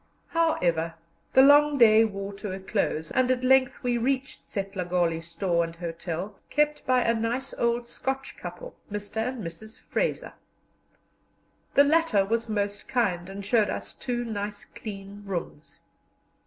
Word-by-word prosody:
However, 170 - +1 0.4
the 265 - +7
long 290 +1 +6
day 225 -2 +7
wore 200 -1 -5
to 200 0 -6
a 190 - -5
close, 190 -5 -1
and 255 -1 +2
at 255 0 +1
length 260 0 +3
we 245 -1 +1
reached 265 +2 -1
Setlagoli 180 -4 -1
store 170 +1 0
and 165 0 -6
hotel, 170 +3 -5
kept 300 0 +1
by 255 -1 +4
a 230 - +3
nice 235 +4 -2
old 235 0 0
Scotch 265 +2 -4
couple, - - -8 0.2
Mr. 205 +1 -5
and 240 0 -2
Mrs. 185 +7 -8
Fraser. - - -2 1.4
The 280 - +8
latter 290 -9 +3
was 230 +2 -1
most 205 -1 -2
kind, 190 -8 0
and 195 0 -7
showed 215 -1 +3
us - - -3
two 240 -2 -3
nice 205 -2 -4
clean 200 -1 -9
rooms. 175 -5 -6
215 Hz, 145 wpm, -27 LUFS, 190-255 Hz, 1.4 s, The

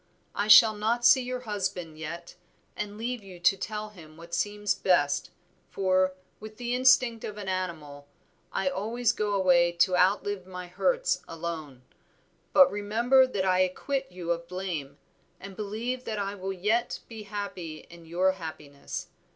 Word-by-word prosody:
I 205 - -1
shall 215 +1 +9
not 225 +3 0
see 260 +2 +7
your 250 0 -4
husband 190 -8 -4
yet, 170 +2 -7 0.4
and 210 0 -5
leave 240 +1 -3
you 190 -3 -12
to 175 - +5
tell 215 +2 -5
him 160 -6 -15
what 170 +1 -13
seems 205 +2 0
best, 145 -7 +1 0.4
for, 185 -1 +1 0.2
with 215 0 -10
the 245 0 -3
instinct 250 -2 +4
of 210 - -6
an 205 -2 -7
animal, 160 -7 -4 0.4
I 190 - -1
always 220 +6 0
go 210 -2 -1
away 175 -3 +4
to 180 +2 +3
outlive 190 +1 +1
my 180 -1 -7
hurts - - 0
alone. 160 -6 -6 0.7
But 275 -1 +7
remember 235 +6 +3
that 200 -7 -2
I 185 -1 +3
acquit 265 +8 -1
you 175 -1 -4
of 170 0 -2
blame, 170 -7 -5 0.4
and 195 0 -10
believe 225 +5 -4
that 220 - -3
I 200 0 -2
will 195 -1 -5
yet 210 +6 0
be 225 -2 -9
happy 195 -6 -6
in 170 -1 -14
your 180 +3 +2
happiness. 155 -6 -7
195 Hz, 160 wpm, -28 LUFS, 175-215 Hz, 0.7 s, shall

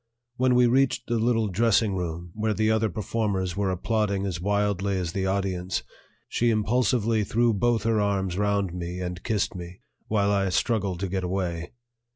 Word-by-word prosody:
When 130 0 +3
we 125 0 +6
reached 125 0 +2
the 120 -1 0
little 115 -1 +2
dressing 110 +1 +2
room, 85 -1 -4
where 110 +1 -1
the 110 +1 +2
other 110 0 +2
performers 100 -3 -2
were 100 -1 0
applauding 100 +1 0
as 90 -3 -3
wildly 100 0 0
as 90 -3 -2
the 95 +1 -1
audience, 95 -1 -1 0.4
she 120 - +1
impulsively 115 0 +2
threw 115 +3 +2
both 115 +1 +1
her 110 -1 +2
arms 95 -3 0
round 100 -2 0
me 90 0 -5
and 90 -1 -4
kissed 110 0 0
me, 90 -1 -9 0.3
while 100 -2 +2
I 100 -1 +1
struggled 95 -2 0
to 100 - 0
get 95 0 -2
away. 90 -2 -3
100 Hz, 175 wpm, -26 LUFS, 95-110 Hz, 0.4 s, we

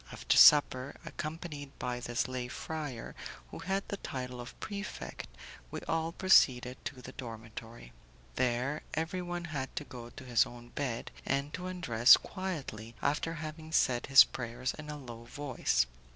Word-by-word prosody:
After - - +1
supper, 140 -2 +7
accompanied 155 -3 -6
by 125 0 -2
this 120 -1 -1
lay 130 -1 -3
friar, 145 -2 -5 0.4
who - - -7
had 195 +2 -1
the 200 - -3
title 125 -6 -5
of 120 - -10
prefect, 200 - -6 0.4
we - - -4
all 165 0 -1
proceeded 130 -9 +4
to 130 -3 -6
the - - -8
dormitory. 115 - -9 0.4
There, 125 - 0
everyone 175 +2 -2
had 130 -2 -3
to - - -2
go 120 -4 -9
to 130 - -11
his 120 -2 +4
own 120 0 -11
bed, 125 -3 -3
and 140 +2 -1
to 180 0 -4
undress 130 -11 +6
quietly 140 - -5
after 150 +3 0
having 155 0 -7
said 125 -6 +2
his 135 0 +10
prayers 125 +1 -4
in 155 -1 -9
a 150 - -4
low 120 -4 -9
voice. 130 - 0
135 Hz, 150 wpm, -32 LUFS, 120-160 Hz, 0.4 s, his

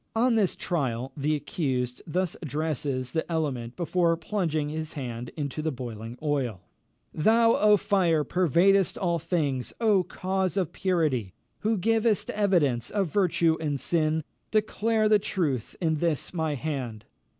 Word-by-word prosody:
On 240 +2 +3
this 210 -5 +2
trial 130 -7 -2
the 150 +1 0
accused 130 -4 -2
thus 180 +2 -1
addresses 145 -4 -2
the 160 +1 -2
element 130 -7 -2
before 170 -1 +1
plunging 160 -4 -1
his 155 0 -4
hand 120 -4 -5
into 145 0 -3
the 160 0 -1
boiling 120 -2 -7
oil: 130 - -1 0.5
"Thou, 230 +7 +4
O 210 0 +5
fire! 175 -6 +2
pervadest 185 +5 +3
all 170 -2 0
things. 145 -7 -1
O 215 -4 +4
cause 185 +2 -2
of 185 -5 0
purity! 155 - 0 0.2
who 220 +1 +1
givest 225 +2 +1
evidence 160 - +1
of 195 -6 -1
virtue 170 -4 +2
and 150 -3 -1
of - - -4
sin, 155 +2 +1 0.3
declare 215 +1 +1
the 210 -1 +5
truth 145 - -2
in 160 -3 +1
this 165 0 -1
my 160 -3 -1
hand!" 125 -7 -4
160 Hz, 145 wpm, -27 LUFS, 140-190 Hz, 0.5 s, O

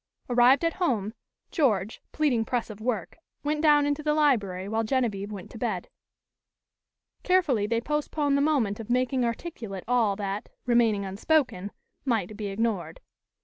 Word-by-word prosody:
Arrived 250 +6 +5
at 330 - +1
home, 220 - 0 0.4
George, 220 - +1
pleading 275 -7 +1
press 235 -1 -2
of 215 0 -11
work, 225 - -3 0.2
went 300 +1 0
down 295 -2 +5
into 290 +1 0
the 300 0 +1
library 205 -11 +1
while 220 +2 0
Genevieve 215 -4 -1
went 200 -3 -8
to - - -9
bed. - - -2 1.3
Carefully 300 - +2
they 230 +1 0
postponed 295 +1 0
the 280 - +2
moment 260 -9 +1
of 225 - -8
making 255 +1 +1
articulate 230 - -4
all 230 -5 +2
that, 200 +1 -4 0.2
remaining 230 -4 +3
unspoken, 200 - 0 0.3
might 220 -6 -1
be 210 -1 -4
ignored. 210 - -2
235 Hz, 145 wpm, -27 LUFS, 205-285 Hz, 1.3 s, Arrived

